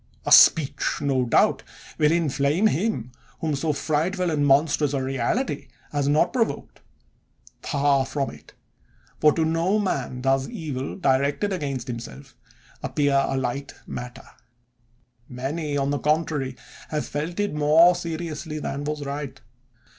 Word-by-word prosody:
A - - -2
speech, 150 -4 +5
no 135 -3 +1
doubt, 115 - +3 0.4
will 150 0 +4
inflame 155 +2 +1
him 175 - 0 0.3
whom 155 -2 -1
so 155 +3 0
frightful 165 +5 -1
and 145 -2 +1
monstrous 145 +1 +3
a 135 - -1
reality 135 - -1 0.2
has 145 -1 0
not 150 +2 +2
provoked! 230 -3 -2 0.8
Far 140 -2 +1
from 140 -2 -2
it: 75 0 -16 0.6
for 150 - +6
to 160 - +1
no 165 +5 +1
man 135 -11 -2
does 135 0 +1
evil, 140 -5 -5
directed 140 +5 +1
against 140 -8 -3
himself, 115 - -8 0.5
appear 140 -2 +1
a 135 - -1
light 130 +2 -3
matter; 125 0 -7 1.0
many, 145 +4 -3
on 140 0 0
the 145 - -1
contrary, 150 -4 0 0.3
have 150 -1 -2
felt 160 +6 -4
it 205 -4 0
more 155 +4 +5
seriously 165 -2 -5
than 145 -1 -4
was 150 -1 -3
right. 140 -1 -5
145 Hz, 135 wpm, -24 LUFS, 135-160 Hz, 1.0 s, for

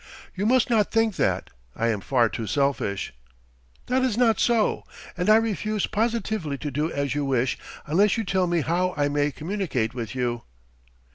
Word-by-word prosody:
"You 200 +3 -1
must 255 0 +4
not 215 -3 +3
think 225 -3 +1
that. - - 0 0.2
I 115 - 0
am 105 -3 -1
far 120 +1 +2
too 115 0 -5
selfish 135 - -1 0.4
" - - -34
"That 255 +1 +1
is 255 -4 0
not 235 -3 +3
so. 235 -3 +2 0.3
And 180 - -1
I 215 - +8
refuse 215 -1 0
positively 215 -8 -1
to 145 +1 -5
do 150 +5 -1
as 140 -2 -1
you 145 0 -1
wish 130 -2 +1 0.3
unless 190 +8 +3
you 225 - 0
tell 190 -2 +1
me 170 -1 +1
how 180 +4 0
I 145 0 +2
may 145 0 +1
communicate 155 - -2
with 120 -2 -5
you." 120 -2 -1
165 Hz, 185 wpm, -25 LUFS, 130-215 Hz, 0.4 s, I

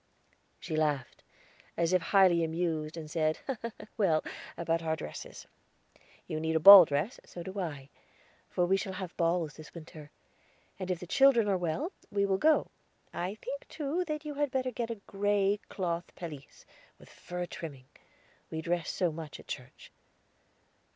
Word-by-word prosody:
She 155 - -4
laughed, 150 -5 -1 0.5
as 170 +1 +1
if 185 - +4
highly 180 -2 +4
amused, 160 -1 -2
and 160 -2 -6
said: 155 0 0 0.6
"Well, 170 -8 +3 0.3
about 165 0 0
our 160 -1 0
dresses. - - -8 0.8
You 155 - -3
need 160 0 -1
a - - +4
ball 195 +1 +12
dress, 150 - -2
so 175 - -9
do 190 +3 -6
I; 145 -7 -5 0.6
for 180 - +1
we 190 +2 +3
shall 195 0 -4
have 185 -2 -6
balls 165 -2 0
this 155 +1 -12
winter, 155 -2 -10 0.7
and 185 -1 -4
if 180 -2 -1
the 180 - -7
children 250 +2 +5
are 200 - +2
well, 180 - -2 0.2
we 200 0 +1
will 195 -1 +1
go. 310 0 +3 0.4
I 185 +4 -3
think, - - -7
too, 310 +4 -2
that 305 -1 -4
you 300 - -4
had 290 0 0
better 255 -1 -1
get 235 0 -3
a 230 - -2
gray 205 0 +1
cloth 170 -2 -3
pelisse, 155 -6 -9 0.3
with - - -17
a - - -17
fur 180 0 -5
trimming. 145 -7 -8 0.6
We 160 0 -4
dress 170 0 -1
so 180 -3 0
much 155 -1 -8
at - - -15
church." 130 -2 -8
175 Hz, 165 wpm, -31 LUFS, 160-200 Hz, 0.8 s, ball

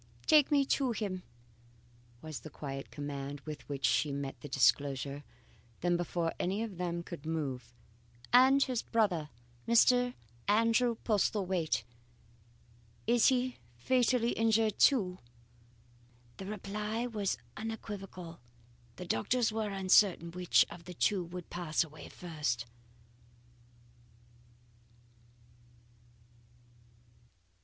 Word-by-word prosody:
"'Take 300 -3 +6
me 280 -2 +4
to 265 -2 +1
him,' 200 -4 -3 1.0
was 155 -2 -6
the 155 - -10
quiet 135 -1 -6
command, 145 -1 -5
with 150 -1 -8
which 140 -1 -2
she 150 - +2
met 140 -1 -3
this 145 - -8
disclosure. 140 +1 +1 0.6
Then, 175 0 +2
before 170 -1 -1
any 195 +5 -1
of 210 -6 -6
them 170 -1 -2
could 170 -4 -8
move: 135 -7 -3 0.6
"'And 265 +2 +7
his 255 -3 -1
brother, 180 -9 0 0.4
Mr. 245 +2 +4 0.3
Andrew 230 +3 +3
Postlethwaite? 185 - 0 1.2
Is 235 +1 +4
he 255 -1 +1 0.2
fatally 245 - +2
injured 225 -1 +2
too?' 190 -10 +4 1.2
"The 190 - -7
reply 210 +3 -3
was 210 - -1 0.2
unequivocal. 195 -6 -7 0.6
The 180 - -7
doctors 225 - +1
were 215 -1 -2
uncertain 190 -3 +3
which 180 0 +3
of 170 0 -10
the 180 0 -9
two 190 +2 +1
would 175 0 -9
pass 170 -2 0
away 155 -2 -11
first. 150 -9 -3
185 Hz, 105 wpm, -32 LUFS, 155-225 Hz, 1.2 s, And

